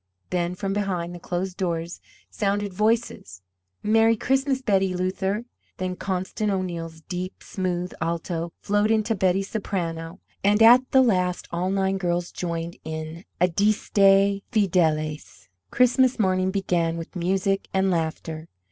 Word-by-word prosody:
Then 175 Hz, 0 st, -1 dB
from 195 Hz, +1 st, -2 dB
behind 185 Hz, -4 st, -2 dB
the 175 Hz, -, -8 dB
closed 180 Hz, +2 st, -3 dB
doors 170 Hz, -2 st, -3 dB, 0.3 s
sounded 200 Hz, -1 st, -1 dB
voices: 210 Hz, -, -1 dB, 0.4 s
"Merry 225 Hz, +1 st, +4 dB
Christmas, 270 Hz, +2 st, +1 dB
Betty 195 Hz, -4 st, +2 dB
Luther!" 190 Hz, +4 st, -1 dB, 0.3 s
Then 185 Hz, 0 st, -3 dB
Constance 190 Hz, +3 st, -2 dB
O'Neill's 170 Hz, -4 st, -4 dB
deep, 180 Hz, +2 st, -6 dB
smooth 180 Hz, -1 st, -3 dB
alto 170 Hz, 0 st, -2 dB
flowed 205 Hz, +1 st, +2 dB
into 220 Hz, 0 st, +2 dB
Betty's 190 Hz, -1 st, +1 dB
soprano; 170 Hz, -5 st, -3 dB, 0.2 s
and 210 Hz, +2 st, +4 dB
at 250 Hz, +3 st, +7 dB
the 265 Hz, -1 st, +5 dB
last 180 Hz, -6 st, +1 dB
all 175 Hz, +2 st, -1 dB
nine 195 Hz, 0 st, 0 dB
girls 175 Hz, -1 st, -1 dB
joined 170 Hz, -1 st, -4 dB
in 160 Hz, +2 st, -6 dB
"Adeste 195 Hz, +1 st, +3 dB
Fideles." 155 Hz, -, 0 dB, 0.2 s
Christmas 250 Hz, +1 st, +3 dB
morning 185 Hz, -3 st, +2 dB
began 175 Hz, -4 st, 0 dB
with 165 Hz, +3 st, -8 dB
music 190 Hz, +2 st, 0 dB
and 190 Hz, 0 st, +2 dB
laughter. 160 Hz, -1 st, -3 dB
185 Hz, 130 wpm, -24 LUFS, 170-205 Hz, 0.4 s, at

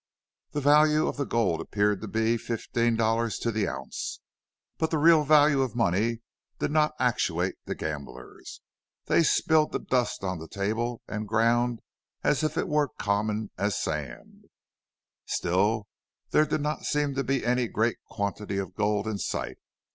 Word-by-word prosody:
The 145 Hz, -, -1 dB
value 150 Hz, +2 st, +5 dB
of -, -, -3 dB
the 140 Hz, -3 st, -2 dB
gold 115 Hz, -8 st, +1 dB
appeared 105 Hz, -1 st, 0 dB
to 110 Hz, -, -5 dB
be 110 Hz, +3 st, +1 dB
fifteen 115 Hz, 0 st, -1 dB
dollars 115 Hz, 0 st, +1 dB
to 115 Hz, -, -1 dB
the 110 Hz, -2 st, 0 dB
ounce, 65 Hz, 0 st, -5 dB, 0.6 s
but 160 Hz, -, +1 dB
the 160 Hz, -, 0 dB
real 160 Hz, 0 st, +6 dB
value 150 Hz, -1 st, +5 dB
of 130 Hz, -3 st, -2 dB
money 115 Hz, +1 st, +1 dB, 0.4 s
did -, -, -1 dB
not 155 Hz, 0 st, +2 dB
actuate 95 Hz, -8 st, +1 dB
the -, -, -3 dB
gamblers. 75 Hz, -2 st, -7 dB, 0.4 s
They -, -, +3 dB
spilled 160 Hz, -1 st, +3 dB
the -, -, 0 dB
dust 125 Hz, -5 st, -1 dB
on 95 Hz, -3 st, -2 dB
the 80 Hz, -, -8 dB
table 110 Hz, +6 st, -2 dB
and 105 Hz, 0 st, -4 dB
ground 115 Hz, +2 st, +2 dB, 0.4 s
as 150 Hz, -, +2 dB
if 155 Hz, -, -1 dB
it -, -, 0 dB
were 150 Hz, 0 st, +2 dB
as 135 Hz, -, -17 dB
common 105 Hz, +1 st, -1 dB
as 100 Hz, +1 st, 0 dB
sand. 75 Hz, -6 st, -5 dB, 0.8 s
Still 100 Hz, +5 st, +1 dB, 0.5 s
there 155 Hz, -, +4 dB
did 150 Hz, -, -1 dB
not 150 Hz, +1 st, -2 dB
seem 145 Hz, -1 st, 0 dB
to 135 Hz, +1 st, -1 dB
be 135 Hz, -2 st, -1 dB
any 125 Hz, 0 st, +2 dB
great 115 Hz, +2 st, 0 dB
quantity 100 Hz, 0 st, -3 dB
of 95 Hz, -2 st, -4 dB
gold 105 Hz, +1 st, 0 dB
in 110 Hz, -2 st, -3 dB
sight. -, -, -3 dB
115 Hz, 165 wpm, -27 LUFS, 100-140 Hz, 0.8 s, real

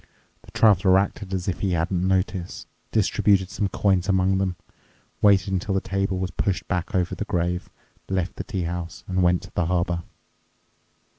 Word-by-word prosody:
The -, -, -17 dB
Traveler 95 Hz, -3 st, +4 dB
acted 100 Hz, 0 st, -1 dB
as 95 Hz, -1 st, -2 dB
if 95 Hz, -, -1 dB
he 95 Hz, -3 st, 0 dB
hadn't 90 Hz, +2 st, 0 dB
noticed, 95 Hz, -1 st, -1 dB, 0.3 s
distributed 100 Hz, -2 st, +2 dB
some 100 Hz, -, -1 dB
coins 95 Hz, -1 st, +1 dB
among 95 Hz, 0 st, +2 dB
them, 95 Hz, -2 st, -1 dB, 0.7 s
waited 100 Hz, -2 st, +4 dB
until 95 Hz, +1 st, -1 dB
the -, -, +3 dB
table 95 Hz, 0 st, -1 dB
was 95 Hz, 0 st, -2 dB
pushed 95 Hz, +1 st, -1 dB
back 90 Hz, -1 st, -2 dB
over 90 Hz, -1 st, +1 dB
the -, -, -3 dB
grave, 90 Hz, -3 st, -1 dB, 0.4 s
left 95 Hz, -1 st, -2 dB
the -, -, -3 dB
tea 95 Hz, -2 st, -3 dB
house, 85 Hz, +1 st, -5 dB
and 95 Hz, 0 st, 0 dB
went 90 Hz, 0 st, +3 dB
to -, -, -12 dB
the 90 Hz, -, 0 dB
harbour. 85 Hz, -1 st, 0 dB
95 Hz, 170 wpm, -24 LUFS, 90-95 Hz, 0.7 s, Traveler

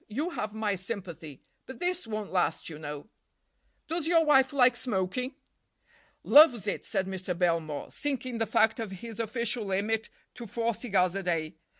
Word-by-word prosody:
You 290 Hz, +11 st, -2 dB
have 215 Hz, -9 st, -4 dB
my 215 Hz, -2 st, 0 dB
sympathy. 180 Hz, -, -6 dB, 0.2 s
But 260 Hz, -, -9 dB
this 360 Hz, -2 st, -1 dB
won't 215 Hz, -2 st, -4 dB
last, 180 Hz, -2 st, 0 dB
you 150 Hz, -, -8 dB
know." 150 Hz, +1 st, -7 dB, 0.8 s
"Does 325 Hz, -1 st, -1 dB
your 330 Hz, -1 st, +4 dB
wife 270 Hz, -3 st, +5 dB
like 255 Hz, -3 st, +4 dB
smoking?" 245 Hz, +3 st, -2 dB, 0.9 s
"Loves 285 Hz, -8 st, +7 dB
it," 205 Hz, -, -2 dB
said 195 Hz, -3 st, -1 dB
Mr. 185 Hz, -2 st, -4 dB
Belmore, 165 Hz, -4 st, -1 dB
sinking 255 Hz, -4 st, -3 dB
the 225 Hz, -, 0 dB
fact 220 Hz, +2 st, +3 dB
of 225 Hz, -2 st, -3 dB
his 220 Hz, +4 st, -8 dB
official 235 Hz, +1 st, -1 dB
limit 210 Hz, +3 st, -1 dB, 0.2 s
to 240 Hz, -2 st, -9 dB
four 230 Hz, +3 st, -1 dB
cigars 195 Hz, -5 st, +1 dB
a 195 Hz, -, -1 dB
day. 165 Hz, -3 st, -1 dB
220 Hz, 165 wpm, -29 LUFS, 185-250 Hz, 0.9 s, Loves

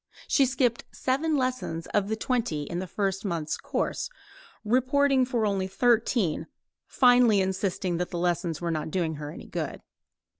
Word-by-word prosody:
She 275 Hz, -3 st, +4 dB
skipped 250 Hz, -2 st, +1 dB
seven 295 Hz, +4 st, 0 dB
lessons 255 Hz, -11 st, -2 dB
of 205 Hz, -1 st, +2 dB
the 220 Hz, -, -1 dB
twenty 220 Hz, -, -1 dB
in 170 Hz, +4 st, -4 dB
the 185 Hz, -, -4 dB
first 195 Hz, +1 st, -2 dB
month's 170 Hz, -6 st, -2 dB
course, -, -, -2 dB, 0.6 s
reporting 260 Hz, +3 st, +3 dB
for 240 Hz, -3 st, 0 dB
only 195 Hz, -2 st, 0 dB
thirteen, 220 Hz, -6 st, +1 dB, 0.4 s
finally 245 Hz, -4 st, +5 dB
insisting 190 Hz, -2 st, -1 dB
that 180 Hz, +1 st, -2 dB
the 175 Hz, -, -4 dB
lessons 175 Hz, -2 st, 0 dB
were 170 Hz, -1 st, -2 dB
not 155 Hz, -1 st, -2 dB
doing 160 Hz, -2 st, -1 dB
her 145 Hz, 0 st, -6 dB
any -, -, -10 dB
good. -, -, -5 dB
200 Hz, 155 wpm, -27 LUFS, 175-250 Hz, 0.6 s, finally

